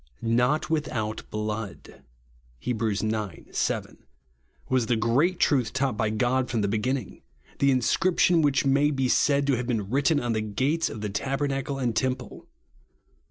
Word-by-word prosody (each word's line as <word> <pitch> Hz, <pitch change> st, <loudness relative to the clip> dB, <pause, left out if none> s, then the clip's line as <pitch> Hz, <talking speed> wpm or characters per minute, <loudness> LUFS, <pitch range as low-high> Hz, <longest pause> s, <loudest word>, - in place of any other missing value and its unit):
"Not 125 Hz, +6 st, +2 dB
without 125 Hz, -9 st, -2 dB
blood" 105 Hz, -9 st, -5 dB, 0.6 s
(Heb. 120 Hz, -3 st, -2 dB
ix. 110 Hz, -3 st, 0 dB, 0.6 s
7) -, -, -2 dB, 0.7 s
was 130 Hz, -3 st, +1 dB
the 120 Hz, -, +2 dB
great 130 Hz, +11 st, +1 dB
truth 130 Hz, -6 st, +2 dB
taught 135 Hz, -3 st, 0 dB
by 110 Hz, 0 st, 0 dB
God 125 Hz, +4 st, 0 dB
from 115 Hz, -3 st, 0 dB
the 100 Hz, -, +1 dB
beginning; 125 Hz, +6 st, -2 dB, 0.4 s
the 140 Hz, -, +4 dB
inscription 170 Hz, +6 st, +3 dB
which 140 Hz, -3 st, +2 dB
may 140 Hz, +2 st, +3 dB
be 135 Hz, -3 st, 0 dB
said 140 Hz, +2 st, +3 dB
to 140 Hz, -, +2 dB
have 120 Hz, 0 st, -3 dB
been 110 Hz, -5 st, -2 dB
written 145 Hz, +3 st, +2 dB
on 120 Hz, -3 st, -1 dB
the 110 Hz, -, 0 dB
gates 130 Hz, +10 st, 0 dB
of 110 Hz, -, -7 dB
tabernacle 135 Hz, +3 st, -2 dB
and 120 Hz, -4 st, -1 dB
temple. 130 Hz, 0 st, -3 dB
130 Hz, 150 wpm, -26 LUFS, 110-140 Hz, 0.7 s, the